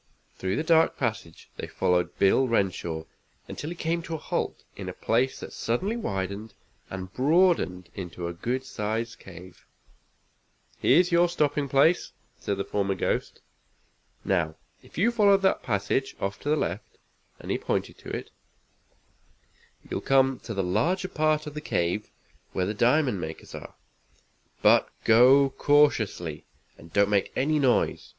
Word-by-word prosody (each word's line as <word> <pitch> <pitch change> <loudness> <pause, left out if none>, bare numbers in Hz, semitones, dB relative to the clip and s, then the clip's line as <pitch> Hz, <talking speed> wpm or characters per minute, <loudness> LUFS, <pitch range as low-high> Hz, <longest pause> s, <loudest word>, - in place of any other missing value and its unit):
Through 95 +1 -2
the - - -1
dark 160 0 +3
passage 110 - -4
they - - -5
followed 90 -1 0
Bill 115 +7 +4
Renshaw 90 -7 -1 0.4
until 150 - -6
he 175 - -5
came 170 0 -1
to 165 0 -5
a - - -3
halt - - -3
in - - -6
a - - -6
place 125 +4 0
that - - -8
suddenly 185 - -1
widened 100 - -4 0.3
and 95 0 -7
broadened 135 - +2
into 90 -2 -6
a 85 - -4
good 125 +9 -3
sized 115 -2 -3
cave. 90 -1 -13 1.1
"Here's 180 +1 +4
your 170 +1 +4
stopping 145 -4 0
place," 140 +6 +3 0.3
said 100 - -2
the 100 - -1
former 100 -1 -1
ghost. - - -2 0.8
"Now 85 -5 0 0.3
if - - -17
you 220 +8 +3
follow 205 -4 +5
that 195 -1 +1
passage, 105 +5 -1
off 100 +2 -3
to 145 - -4
the 155 - +4
left," - - -4 0.4
and - - -6
he - - 0
pointed - - -2
to - - -10
it, - - -5 1.6
"you'll - - -3
come 135 -1 +3
to 115 - -5
the 95 - 0
larger 170 - 0
part 155 -2 +1
of 150 - -7
the 150 - -6
cave 90 - -1 0.4
where 90 - 0
the 105 - -2
diamond 120 - +2
makers 80 -1 -7
are. - - -9 0.9
But - - +5
go 130 +4 +6
cautiously, 110 - +2 0.3
and 85 0 -15
don't 100 +2 +3
make 100 -2 +1
any 150 +3 +2
noise. 130 -4 +1
120 Hz, 155 wpm, -26 LUFS, 95-155 Hz, 1.6 s, go